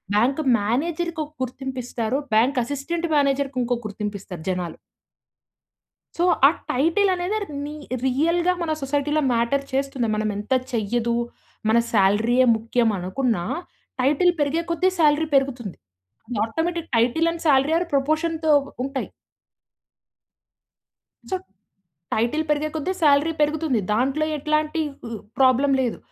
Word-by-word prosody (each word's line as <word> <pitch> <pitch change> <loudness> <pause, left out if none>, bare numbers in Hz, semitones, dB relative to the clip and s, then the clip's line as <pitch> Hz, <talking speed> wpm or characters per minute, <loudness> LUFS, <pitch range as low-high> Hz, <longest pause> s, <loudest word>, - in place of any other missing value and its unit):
Bank 255 +8 +2 0.2
మేనేజర్‌కి 320 +9 -1
ఒక 295 - -18
గుర్తింపు 260 +1 -5
ఇస్తారు, 235 +1 -2 0.2
బ్యాంక్ 250 +4 +3
అసిస్టెంట్ 290 +7 -3
మేనేజర్‌కింకో 270 -3 +1
గుర్తింపిస్తారు 200 -5 -6
జనాలు. 180 -3 -3 1.4
సో, 345 - +1 0.2
ఆ - - +4 0.2
టైటిల్ 335 +10 +2
అనేదే 365 +4 -1
ర్ - - -17 0.2
నీ 295 +1 -6 0.3
రియల్‌గా 335 +7 +2
మన 315 -2 -1
సొసైటీలో 290 +2 0
మ్యాటర్ 235 +4 +1
చేస్తుంది. 270 -3 -1
మనం 215 0 -1
ఎంత 210 +5 -5 0.2
చెయ్యదు, 235 +1 0 0.5
మన 225 +2 +5
సాలరీయే 225 +5 +3
ముఖ్యమనుకున్నా 220 -2 0 0.6
టైటిల్ 300 +7 +3
పెరిగే 295 +4 +1
కొద్దీ 365 +3 +2
సాలరీ 305 0 +4
పెరుగుతుంది. 250 -8 0 0.7
Automatic 335 +7 -3
title 250 +9 +2
and 335 0 -8
salary 280 +3 +4
are 350 - -2
ప్రపోర్షన్‌తో 315 +3 +1 0.3
ఉంటాయి. 275 -1 -3 2.2
సొ, 375 - +1 0.8
టైటిల్ 240 +8 +1
పెరిగే 300 +1 +1
కొద్దీ 315 +4 -1
సాలరీ 295 +2 +4
పెరుగుతుంది. 300 -5 +1
దాంట్లో 270 +7 +1
ఎట్లాంటి 305 +2 0 0.3
ఉ - - -9 0.3
ప్రాబ్లమ్ 270 +1 +4
లేదు. 240 - -2
275 Hz, 115 wpm, -23 LUFS, 235-315 Hz, 2.2 s, మన